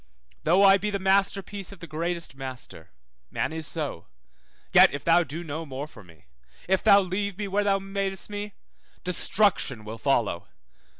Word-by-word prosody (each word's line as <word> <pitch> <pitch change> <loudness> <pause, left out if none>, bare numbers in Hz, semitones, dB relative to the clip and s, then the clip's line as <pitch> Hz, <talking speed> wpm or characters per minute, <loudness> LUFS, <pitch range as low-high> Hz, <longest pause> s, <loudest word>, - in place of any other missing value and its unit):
Though 180 +5 +5
I 195 0 +7
be 210 +2 -2
the 200 - -1
masterpiece 195 0 0
of 200 - -12
the 170 - -8
greatest 170 0 -3
master 130 - -8 0.4
(man - - -2
is 160 -1 -3
so), 150 - -3 0.7
yet - - +8
if 140 - -6
thou 170 +1 +4
do 160 +3 -6
no 160 0 -5
more 140 -2 -6
for 150 - -14
me, 85 -6 -20 0.4
if 190 +1 +1
thou 200 -2 +7
leave 190 +1 -3
me 205 -1 -3
where 200 +2 0
thou 200 -1 +2
madest 195 0 -3
me, 205 -1 -6 0.5
destruction 180 - +1
will 110 +1 -7
follow. 115 -10 0
175 Hz, 170 wpm, -26 LUFS, 145-195 Hz, 0.7 s, yet